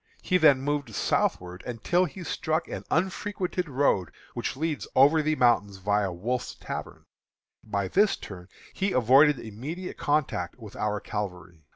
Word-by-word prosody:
He 185 -1 +2
then 145 -5 +6
moved 145 0 -2
southward 90 0 0
until 150 +10 +1
he 180 +2 -8
struck 160 +1 -1
an - - -6
unfrequented 185 0 -1
road 125 - +1 0.2
which - - -3
leads 155 0 -2
over 145 +4 +6
the 155 +1 +1
mountain 120 -6 +3
viâ 100 0 0
Wolfe's 120 +8 -3
Tavern. - - -7 0.6
By 100 -3 -2
this 200 - +3
turn 90 -3 -10 0.3
he 195 0 -1
avoided 135 +3 +5
immediate 145 - -6
contact 145 - 0
with 110 -4 -11
our 105 0 -1
cavalry. 90 -6 -6
130 Hz, 145 wpm, -27 LUFS, 100-160 Hz, 0.6 s, then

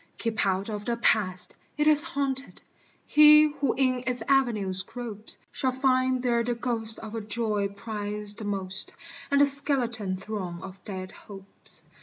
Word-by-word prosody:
Keep 230 -1 -1
out 190 +1 -1
of 210 -2 -5
the 235 -1 -1
Past. 185 -6 +1 0.2
It 300 - +1
is 300 -1 +9
haunted: 275 -1 -4 0.4
He 300 0 +7
who 280 -4 -1
in 255 -2 0
its 250 -2 0
avenues 215 -9 +1
gropes, 225 0 -7
Shall 265 -3 -1
find 255 -1 +1
there 235 -2 +1
the 240 +1 -2
ghost 230 -2 -3
of 220 -1 -9
a 225 - -3
joy 210 -1 -1
prized 205 0 -2
the 215 - -6
most, 190 -2 0 0.3
And 280 0 +4
a - - +7
skeleton 245 -9 0
throng 190 -3 -6
of 190 0 -11
dead 185 -2 -6
hopes. 195 -2 -11
225 Hz, 160 wpm, -27 LUFS, 200-255 Hz, 0.4 s, is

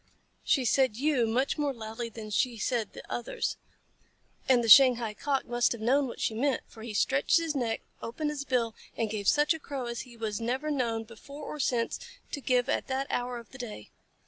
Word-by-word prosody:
She 265 -3 +2
said 255 -3 +3
"you" 270 -4 +2
much 255 +7 0
more 285 -2 0
loudly 225 +1 -5
than 215 -1 -8
she 235 +3 +1
said 225 -1 -1
"the - - -9
others," 240 - -3 0.9
and 245 -2 +5
the - - -1
Shanghai 240 -2 +7
Cock 275 +4 -1
must 240 0 +2
have 235 - -8
known 265 +5 +3
what 240 - -8
she - - 0
meant, 260 +3 0
for 220 - -14
he 230 0 -6
stretched 275 +9 +3
his 330 -2 0
neck, 230 -4 -1 0.2
opened 295 +6 -3
his 290 -2 -4
bill, 245 -4 0 0.2
and 220 -2 -1
gave 205 -2 -3
such 300 +2 +4
a 320 - -6
crow 275 -4 -5
as 235 0 -4
he 245 -2 -12
was 220 -1 -3
never 260 +6 -1
known, 235 -5 0
before 235 +6 -11
or 300 - -6
since, 240 -4 0 0.3
to 285 - -4
give 250 -2 +2
at - - 0
that 265 +1 -1
hour 245 0 -1
of 235 -2 -11
the 265 - -12
day. 215 - -7
245 Hz, 210 wpm, -29 LUFS, 230-275 Hz, 0.9 s, Shanghai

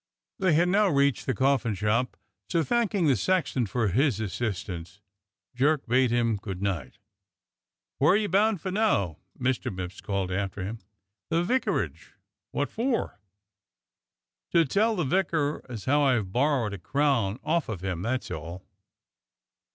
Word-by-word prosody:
They 185 -4 +3
had 170 +4 +4
now 205 +3 +4
reached 140 -5 +2
the 130 - +1
coffin 130 -3 +2
shop, 110 +6 0 0.3
so, 170 -2 +2
thanking 215 -4 +1
the 140 -4 +4
sexton 140 - 0
for 110 0 0
his 125 - +2
assistance. 95 -4 -4 0.5
Jerk 140 +3 +2
bade 125 +1 +3
him 115 -2 +1
good 95 -2 -6
night. 90 -9 -3 1.0
"Where 150 +6 +5
are - - +5
you 215 -1 0
bound 205 0 +2
for 190 - -3
now?" 100 - +1 0.2
Mr. 130 0 0
Mipps 90 -1 -6
called 100 -2 -2
after 95 +1 -2
him. 110 +4 -5 0.5
"The 165 +1 +2
vicarage." 255 +8 -1 0.4
"W^otfor?" 235 - -1 1.4
"To 170 -1 +5
tell 215 - +2
the 175 - 0
vicar 155 -1 0
as 115 -5 -7
how 145 +3 +3
I've 120 -9 +2
borrowed 125 -3 +1
a 100 - -6
crown 130 - +1
off 160 -1 0
of 100 -6 -4
him, 90 -3 -3
that's 125 +5 -2
all!" 85 +4 -6
130 Hz, 145 wpm, -27 LUFS, 100-165 Hz, 1.4 s, Where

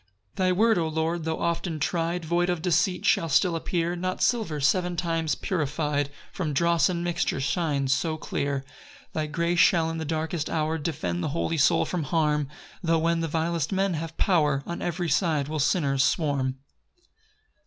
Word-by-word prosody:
6 - - -33
Thy 185 -1 +2
word, 220 +2 +3
O 165 - 0
Lord, 160 +1 -1
tho' 160 0 -1
often 170 -1 -1
try'd, 170 +2 -1
Void 175 +2 +1
of 175 -2 -1
deceit 180 +1 +1
shall 165 - +3
still 165 +5 +3
appear 170 +1 -1
Not 185 +1 -3
silver, 220 -11 +1
seven 175 +5 +1
times 165 -2 0
purify'd 150 -4 -1 0.2
From 155 -6 -2
dross 170 +2 +3
and 170 -1 -2
mixture, 175 -5 -1
shines 140 -2 0
so 155 +3 -1
clear. 140 -2 -2
7 135 - -24 0.4
Thy 155 -1 -1
grace 170 +3 0
shall 165 -3 +4
in 165 - -4
the - - -3
darkest 160 +1 -2
hour 160 0 -1
Defend 90 - -2
the - - -1
holy 165 0 0
soul 145 - +4
from 175 -5 -2
harm; 150 -1 +1 0.3
Tho' 165 -2 +2
when 165 +1 +1
the 165 - -1
vilest 165 0 -1
men 195 -1 +1
have 160 0 -5
power 150 -7 +2
On 170 - -5
every 175 0 -2
side 155 -3 +1
will 155 +1 -3
sinners 140 -3 +2
swarm. 140 -5 0
165 Hz, 180 wpm, -26 LUFS, 150-175 Hz, 0.4 s, shall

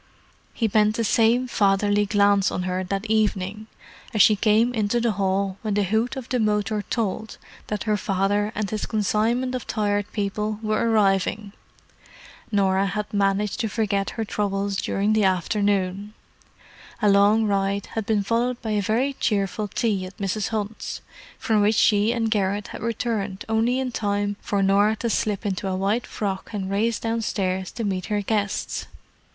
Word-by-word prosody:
He 225 - +1
bent 215 0 +3
the 230 - 0
same 230 +3 +3
fatherly 205 -1 +2
glance 200 -1 +3
on 180 - -3
her 185 0 -2
that 195 +3 -3
evening 215 -1 0 0.5
as 215 - +7
she 215 - +5
came 220 +3 +3
into 220 +1 +1
the 235 -1 +1
hall 195 -1 -1
when 215 -3 -2
the 205 - +2
hoot 220 +5 0
of 260 -2 -6
the 250 - 0
motor 210 -1 0
told 220 -1 -2 0.3
that 210 -2 -3
her 215 -2 +1
father 205 +1 0
and 215 -1 -1
his 215 +1 -3
consignment 225 +4 0
of 255 - -4
Tired 205 -1 -1
People 210 +1 -2
were 215 +2 +1
arriving. 200 -1 +1 1.0
Norah 195 -1 +2
had 210 +2 -4
managed 200 0 +1
to 225 - -1
forget 200 -2 0
her 225 - -1
troubles 200 -1 -1
during 200 +3 0
the 215 -1 +3
afternoon. 200 +1 0 0.8
A 210 - +2
long 205 +2 +5
ride 200 -1 0
had 220 -2 -3
been 210 -2 +2
followed 235 +4 0
by 220 - -4
a 210 -1 +1
very 235 +7 0
cheerful 210 -3 -1
tea 200 -3 -1
at 185 - -14
Mrs. 200 +1 -2
Hunt's, 215 -1 -4 0.4
from 220 -4 +1
which 210 +2 +3
she 210 +1 +4
and 230 -2 -1
Garrett 200 -1 0
had - - -8
returned 215 -3 -2
only 225 +3 +1
in 260 -1 -2
time 205 -2 -1
for 200 -1 0
Norah 200 +3 +3
to 230 +1 -2
slip 210 0 -1
into 195 -1 -2
a 190 - -1
white 200 +5 0
frock 195 -3 -4
and 195 -2 -3
race 220 +3 +1
downstairs 195 -5 -2
to 230 - -4
meet 190 -3 -2
her 210 -1 -1
guests. 205 -1 -2
210 Hz, 170 wpm, -24 LUFS, 195-220 Hz, 1.0 s, as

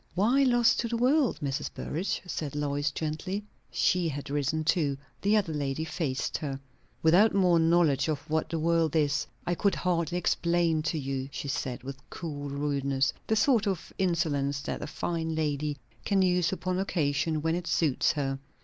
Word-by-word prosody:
"Why 230 +9 +3
lost 240 -3 +4
to 235 - 0
the 230 0 -1
world, 255 - +3
Mrs. 140 -1 -2
Burrage?" 175 +7 -3
said 150 -5 -4
Lois 145 0 0
gently. 160 +7 -3 0.3
She 180 -2 +2
had 140 -1 -5
risen 145 +2 0
too. 155 -4 +1 0.2
The 205 +2 +3
other 185 -6 0
lady 145 +1 -2
faced 145 -6 -2
her. 135 -3 -4 0.4
"Without 180 +8 +5
more 180 -3 +4
knowledge 165 -4 +3
of 150 -1 -3
what 155 0 0
the 165 - -2
world 165 -1 +1
is, 145 -2 +1 0.2
I 175 - +1
could 200 +3 +1
hardly 175 -1 0
explain 170 -2 +1
to 160 - -2
you," 135 -1 -3
she 140 - -5
said, 130 -2 -3
with 135 0 -7
cool 145 -4 -5
rudeness; 140 -1 0
the 220 - +2
sort 225 -1 +3
of 190 -4 -3
insolence 150 -6 0
that - - -4
a - - -4
fine 160 +1 -2
lady 150 -1 -1 0.3
can 195 -2 +2
use 180 -2 +2
upon 185 -1 -2
occasion 155 -4 0
when 160 0 +1
it 175 0 -3
suits 150 -6 +2
her. 135 -2 -2
160 Hz, 175 wpm, -29 LUFS, 145-180 Hz, 0.4 s, Without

